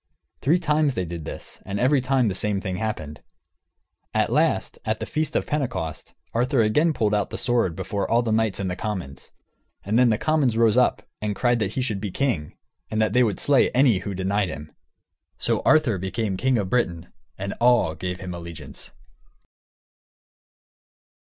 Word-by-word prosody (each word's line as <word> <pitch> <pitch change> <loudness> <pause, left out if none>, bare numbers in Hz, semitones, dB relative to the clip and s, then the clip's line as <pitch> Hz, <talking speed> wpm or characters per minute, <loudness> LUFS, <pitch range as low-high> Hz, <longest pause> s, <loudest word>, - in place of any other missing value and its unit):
Three 160 +6 +3
times 150 -5 +1
they 95 - -1
did 85 -2 -6
this, - - -8
and 100 +1 -4
every 130 +2 +3
time 130 -2 +2
the 100 - 0
same 100 +1 0
thing 95 -1 -4
happened. 85 -8 -4 0.9
At - - +2
last, - - +1
at - - -1
the - - -3
feast 155 0 -2
of - - +1
Pentecost, 125 - -3 0.2
Arthur 125 +1 +2
again 150 +10 +3
pulled 110 -8 0
out 105 -1 +1
the - - -5
sword 120 -9 +1
before 100 +2 -3
all 120 +1 +3
the 115 - -1
knights 110 -3 +1
and 100 - -2
the 90 - -2
commons. 90 -10 -5 0.5
And 110 +4 +2
then 125 -1 +5
the 110 - +2
commons 145 -6 +1
rose 115 -1 +4
up 125 -1 +3 0.2
and 105 -1 -2
cried 120 +1 +2
that 105 -1 -1
he 130 - -1
should 105 -6 -2
be 105 - -3
king, 95 - -2 0.3
and 110 - -2
that 110 -2 +2
they 125 - +4
would 110 -5 +1
slay 140 -2 +4
any 125 -7 +4
who 100 +1 -5
denied 95 +1 0
him. 75 0 -8 0.7
So - - 0
Arthur 145 - +4
became 95 +2 -2
king 130 +5 +1
of 100 -4 -2
Britain, 85 -10 -1 0.2
and 100 +1 -4
all 120 -9 +4
gave 90 +3 -4
him 90 -1 -5
allegiance. 85 -5 -8
110 Hz, 185 wpm, -24 LUFS, 95-125 Hz, 0.9 s, then